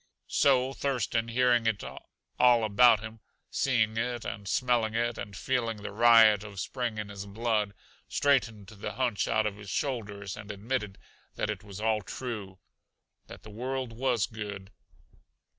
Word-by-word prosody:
So 130 Hz, -1 st, +3 dB
Thurston, 120 Hz, -5 st, -1 dB
hearing 120 Hz, -1 st, +3 dB
it 110 Hz, -3 st, 0 dB
all 115 Hz, -, 0 dB
about 110 Hz, +1 st, +5 dB
him, 110 Hz, +1 st, -8 dB, 0.3 s
seeing 110 Hz, -5 st, +1 dB
it 120 Hz, 0 st, -2 dB
and 100 Hz, 0 st, -5 dB
smelling 120 Hz, -1 st, +1 dB
it 120 Hz, 0 st, 0 dB
and 100 Hz, -1 st, -7 dB
feeling 115 Hz, -5 st, -1 dB
the -, -, -5 dB
riot 110 Hz, -2 st, +6 dB
of 100 Hz, -2 st, -8 dB
Spring 120 Hz, +2 st, -3 dB
in 105 Hz, -1 st, -4 dB
his 100 Hz, 0 st, -7 dB
blood, 105 Hz, -1 st, -1 dB, 0.3 s
straightened 120 Hz, -8 st, +1 dB
the 105 Hz, +1 st, -7 dB
hunch 120 Hz, -2 st, 0 dB
out 110 Hz, 0 st, +2 dB
of 105 Hz, -1 st, -2 dB
his 105 Hz, -1 st, -10 dB
shoulders 105 Hz, -8 st, -3 dB
and 105 Hz, 0 st, -10 dB
admitted 105 Hz, 0 st, -3 dB, 0.4 s
that -, -, -1 dB
it 105 Hz, -1 st, -7 dB
was 100 Hz, -2 st, -9 dB
all 110 Hz, 0 st, +1 dB
true: 105 Hz, -4 st, -6 dB, 0.7 s
that -, -, -12 dB
the 110 Hz, -, -11 dB
world 130 Hz, +2 st, -4 dB
was 120 Hz, -2 st, +1 dB
good. 100 Hz, -3 st, -7 dB
110 Hz, 155 wpm, -29 LUFS, 105-120 Hz, 0.7 s, riot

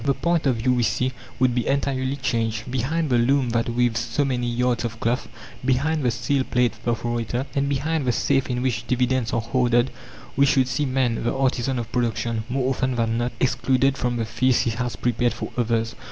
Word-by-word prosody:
The 140 Hz, -1 st, +1 dB
point 170 Hz, -3 st, +1 dB
of 130 Hz, -, +3 dB
view, 125 Hz, +3 st, +1 dB
we 125 Hz, -, +1 dB
see, 120 Hz, +3 st, +1 dB, 0.3 s
would 130 Hz, -1 st, +3 dB
be 120 Hz, -1 st, -1 dB
entirely 135 Hz, -1 st, 0 dB
changed. 115 Hz, -3 st, -2 dB
Behind 145 Hz, +6 st, 0 dB
the 120 Hz, -, +4 dB
loom 130 Hz, 0 st, +2 dB
that 115 Hz, 0 st, 0 dB
weaves 120 Hz, -1 st, +1 dB
so 120 Hz, +4 st, -1 dB
many 125 Hz, -2 st, -1 dB
yards 120 Hz, 0 st, 0 dB
of 115 Hz, -1 st, -4 dB
cloth, 120 Hz, +2 st, -1 dB, 0.4 s
behind 140 Hz, +5 st, +1 dB
the 125 Hz, -, +2 dB
steel 135 Hz, +3 st, 0 dB
plate 125 Hz, -2 st, +1 dB
perforator, 120 Hz, +2 st, -1 dB
and 140 Hz, 0 st, 0 dB
behind 145 Hz, +2 st, -1 dB
the -, -, +4 dB
safe 135 Hz, +3 st, +1 dB
in 125 Hz, 0 st, -1 dB
which 120 Hz, -2 st, -1 dB
dividends 125 Hz, -1 st, +1 dB
are 115 Hz, -, 0 dB
hoarded, 120 Hz, +1 st, +2 dB, 0.4 s
we 140 Hz, +1 st, +4 dB
should 130 Hz, -2 st, +3 dB
see 130 Hz, +3 st, -1 dB
man, 130 Hz, -3 st, 0 dB
the 120 Hz, -, -1 dB
artisan 130 Hz, -1 st, 0 dB
of 115 Hz, -1 st, -4 dB
production, 115 Hz, -2 st, -1 dB
more 130 Hz, +1 st, 0 dB
often 130 Hz, -1 st, -1 dB
than 115 Hz, -1 st, 0 dB
not 120 Hz, +1 st, -1 dB
excluded 130 Hz, +1 st, +2 dB
from 125 Hz, -2 st, -1 dB
the 115 Hz, -, -1 dB
feast 120 Hz, +3 st, +2 dB
he 115 Hz, -, 0 dB
has 120 Hz, +1 st, -3 dB
prepared 120 Hz, 0 st, 0 dB
for -, -, -5 dB
others. 115 Hz, -1 st, 0 dB
125 Hz, 205 wpm, -23 LUFS, 120-130 Hz, 0.4 s, the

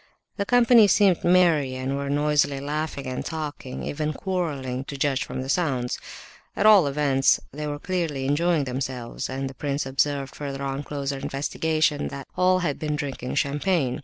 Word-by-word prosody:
The 200 Hz, -1 st, -2 dB
company 240 Hz, -3 st, +6 dB
seemed 195 Hz, -3 st, +4 dB
merry 170 Hz, -7 st, +3 dB
and 130 Hz, +1 st, -2 dB
were 140 Hz, 0 st, -3 dB
noisily 145 Hz, -1 st, +2 dB
laughing 145 Hz, 0 st, -3 dB
and 130 Hz, 0 st, -3 dB
talking—even 150 Hz, -1 st, -4 dB
quarrelling, 145 Hz, -10 st, -3 dB
to 140 Hz, -, -6 dB
judge 135 Hz, -1 st, +1 dB
from 130 Hz, -, -5 dB
the -, -, -7 dB
sounds. 135 Hz, -6 st, 0 dB, 0.6 s
At 200 Hz, -, 0 dB
all 205 Hz, -8 st, +7 dB
events 140 Hz, -1 st, +3 dB
they 150 Hz, +1 st, -5 dB
were 145 Hz, 0 st, -3 dB
clearly 160 Hz, -5 st, -2 dB
enjoying 160 Hz, +2 st, +2 dB
themselves, 125 Hz, -2 st, -4 dB
and 135 Hz, +1 st, -3 dB
the 135 Hz, -, -7 dB
prince 140 Hz, +1 st, -2 dB
observed 135 Hz, +1 st, 0 dB
further 140 Hz, -1 st, -5 dB
on 135 Hz, 0 st, -2 dB
closer 140 Hz, -1 st, -4 dB
investigation—that 145 Hz, 0 st, -1 dB
all 185 Hz, 0 st, +4 dB
had 145 Hz, -4 st, -2 dB
been 150 Hz, -1 st, -1 dB
drinking 140 Hz, -4 st, -4 dB
champagne. 145 Hz, -2 st, 0 dB
145 Hz, 160 wpm, -25 LUFS, 135-160 Hz, 0.6 s, all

